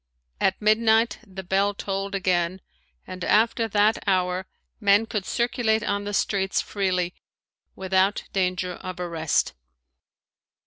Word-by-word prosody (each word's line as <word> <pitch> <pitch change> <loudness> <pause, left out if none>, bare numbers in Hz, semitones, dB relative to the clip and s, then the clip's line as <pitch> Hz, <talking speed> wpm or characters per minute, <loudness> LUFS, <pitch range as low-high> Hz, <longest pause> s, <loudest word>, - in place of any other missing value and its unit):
At 190 - +1
midnight 220 +2 +3
the 190 0 -8
bell 195 +2 +1
tolled 195 0 -3
again 185 -1 0 0.4
and 185 -1 -7
after 225 +3 +3
that 210 +1 +2
hour 185 -1 +1 0.3
men 205 0 +4
could 210 -4 -4
circulate 235 -2 +1
on 205 0 -1
the 205 - -3
streets 195 -1 0
freely 185 -3 -1 0.6
without 190 +1 +1
danger 185 -1 0
of 185 +1 -8
arrest. 165 -3 0
195 Hz, 120 wpm, -25 LUFS, 185-210 Hz, 0.6 s, men